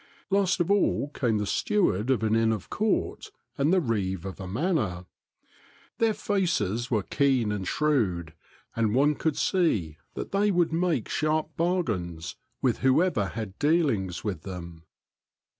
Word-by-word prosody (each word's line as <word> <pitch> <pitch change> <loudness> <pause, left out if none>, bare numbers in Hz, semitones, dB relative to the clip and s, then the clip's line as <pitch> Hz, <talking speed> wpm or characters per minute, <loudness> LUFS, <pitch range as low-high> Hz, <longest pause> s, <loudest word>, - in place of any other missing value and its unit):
Last 195 -2 +2
of 175 +2 +1
all 200 -7 +2
came 120 -6 0
the 105 - -1
steward 130 - +1
of 125 -5 +2
an 110 0 +2
Inn 115 0 +3
of 105 -5 -4
Court, 215 -1 -1 0.3
and 140 +4 +2
the 185 - +4
reeve 95 - -2
of 95 -1 -6
a 95 - -6
manor. 110 - -1 0.9
Their 225 -2 +2
faces 120 - 0
were 110 -5 +1
keen 130 -5 +1
and 100 -3 -3
shrewd, 100 - 0 0.4
and 115 -1 +1
one 145 +3 +4
could 155 0 -1
see 105 - +1 0.2
that - - -5
they 205 +1 +2
would 175 -4 +2
make 165 -7 0
sharp 155 0 -1
bargains 95 - -1 0.3
with 125 -3 +2
whoever 130 - +2
had 105 0 -6
dealings 145 - +1
with 95 -7 -3
them. 85 -3 -8
120 Hz, 150 wpm, -27 LUFS, -, 0.9 s, the